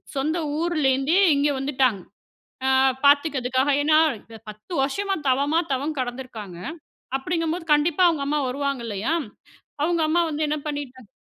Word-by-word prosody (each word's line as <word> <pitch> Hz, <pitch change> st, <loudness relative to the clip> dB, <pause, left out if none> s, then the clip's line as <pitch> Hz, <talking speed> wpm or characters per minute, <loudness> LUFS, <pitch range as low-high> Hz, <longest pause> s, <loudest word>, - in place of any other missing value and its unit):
சொந்த 305 Hz, +5 st, 0 dB, 0.2 s
ஊர்ல 335 Hz, -3 st, 0 dB
இருந்தே 275 Hz, +7 st, +1 dB, 0.2 s
இங்க 285 Hz, +1 st, +2 dB
வந்துட்டாங்க. 260 Hz, -6 st, +1 dB, 0.7 s
ஆ. -, -, +3 dB, 0.4 s
பாத்துக்கிறதுக்காக. 280 Hz, -2 st, +3 dB
ஏன்னா 310 Hz, +1 st, +5 dB, 0.5 s
10 215 Hz, -, -13 dB
வருஷமா 390 Hz, +8 st, -1 dB
தவமா 285 Hz, +5 st, +2 dB
தவம் 285 Hz, +3 st, -2 dB
கடந்துருக்காங்க. 245 Hz, -7 st, -6 dB, 0.6 s
அப்படிங்கும்போது 330 Hz, +3 st, -2 dB
கண்டிப்பா 310 Hz, +4 st, +2 dB
அவங்க 300 Hz, -4 st, -1 dB
அம்மா 300 Hz, +1 st, 0 dB
வருவாங்கல்லையா? 255 Hz, -2 st, -2 dB, 0.7 s
அவங்க 340 Hz, +1 st, +1 dB
அம்மா 345 Hz, +2 st, +2 dB
வந்து 305 Hz, +1 st, -3 dB
என்ன 305 Hz, -, 0 dB
பண்ணிட்டாங்க 260 Hz, -6 st, -6 dB
285 Hz, 125 wpm, -23 LUFS, 260-315 Hz, 0.7 s, ஏன்னா